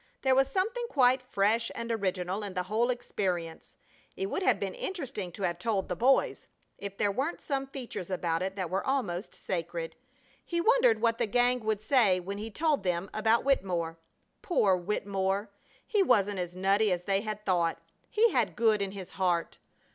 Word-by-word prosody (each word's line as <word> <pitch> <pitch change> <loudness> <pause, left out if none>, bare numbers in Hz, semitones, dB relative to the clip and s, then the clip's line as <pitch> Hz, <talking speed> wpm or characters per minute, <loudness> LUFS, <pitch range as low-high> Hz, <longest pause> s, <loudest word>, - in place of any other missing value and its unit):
There 265 -1 +4
was 270 0 +4
something 465 +6 -1
quite 255 -2 +4
fresh 230 -1 +1
and 230 0 -4
original 190 -2 -1
in 200 -2 -6
the 180 - 0
whole 220 +6 0
experience. 185 -9 -3 0.4
It 390 0 -3
would - - -1
have 380 - +3
been - - -3
interesting 280 - -4
to 200 - -6
have 175 -1 -1
told 200 -2 -1
the 180 - -1
boys, 260 +8 +2 0.3
if 200 0 -6
there 205 - +2
weren't 270 - -2
some 275 -2 -2
features 250 -9 -6
about 170 -3 -1
it 190 +1 -2
that 185 -4 -3
were 190 +1 0
almost 215 -9 -2
sacred. 170 -2 -4 0.5
He 340 - -2
wondered 470 +4 +4
what 230 -1 +2
the - - +1
gang 245 +3 +2
would 215 -2 -2
say 220 -6 +4
when 200 +3 -5
he 220 +2 -5
told 305 +3 +1
them 180 +1 -1
about 220 +2 +2
Wittemore! 175 -11 0 0.4
Poor 275 - +3
Wittemore! 195 +2 -1 0.3
He 420 - +2
wasn't 205 - +3
as 175 0 -4
nutty 195 +3 +2
as 180 -1 -1
they 195 +1 +1
had 215 -1 -5
thought! 175 -3 +1 0.3
He 450 +2 +3
had - - +1
good 220 -3 +3
in 195 -1 -2
his 190 -2 -7
heart! 175 -3 -1
205 Hz, 185 wpm, -29 LUFS, 185-255 Hz, 0.5 s, There